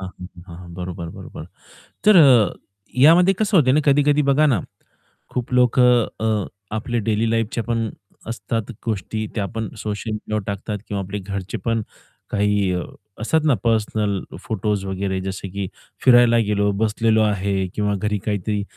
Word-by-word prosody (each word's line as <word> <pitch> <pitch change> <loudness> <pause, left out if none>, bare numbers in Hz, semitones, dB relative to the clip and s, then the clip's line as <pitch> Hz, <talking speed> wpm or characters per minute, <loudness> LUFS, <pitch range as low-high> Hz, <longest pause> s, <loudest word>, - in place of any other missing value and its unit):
हां. 95 - -5
हं. 90 - -6 0.2
हां. 85 0 -10
बरोबर, 90 -1 -6
बरोबर. - - -9 0.6
तर 210 -2 +7 0.8
यामध्ये 170 +8 +6
कसं 210 -2 +3
होतंय 130 -5 +4
आणि 150 +3 +3
कधी-कधी 145 +1 +4
बघा 140 +2 +3
ना 130 -9 +3 0.7
खूप 125 0 -4
लोक 125 0 +3
अ, 110 -4 +2 0.3
आपल्या 120 +2 -2
डेली 110 +1 +1
लाईफच्या 115 0 -1
पण 115 -1 -1 0.4
असतात 115 -1 -3
गोष्टी 110 0 -3
त्या 105 -3 -1
पण 110 -1 -2
सोशल 105 +1 -4
मीडियावर 110 0 -3
टाकतात 100 +1 -3
किंवा 100 -1 -3
आपले 100 +2 -5
घरचे 100 +2 -5
पण 115 -1 +1 0.5
काही 105 -2 +1 0.5
असतात 160 +8 +2
ना 150 - +4
पर्सनल 105 -3 0 0.2
फोटोस 105 -2 -2
वगैरे 95 0 -2
जसे 95 +1 -5
की 100 +1 -4 0.4
फिरायला 120 -2 +6
गेलो 105 -1 +1
बसलेलो 110 0 +2
आहे 100 -2 0
किंवा 105 -1 0
घरी 105 +1 -1
काहीतरी 105 0 -1
110 Hz, 145 wpm, -21 LUFS, 100-120 Hz, 0.8 s, तर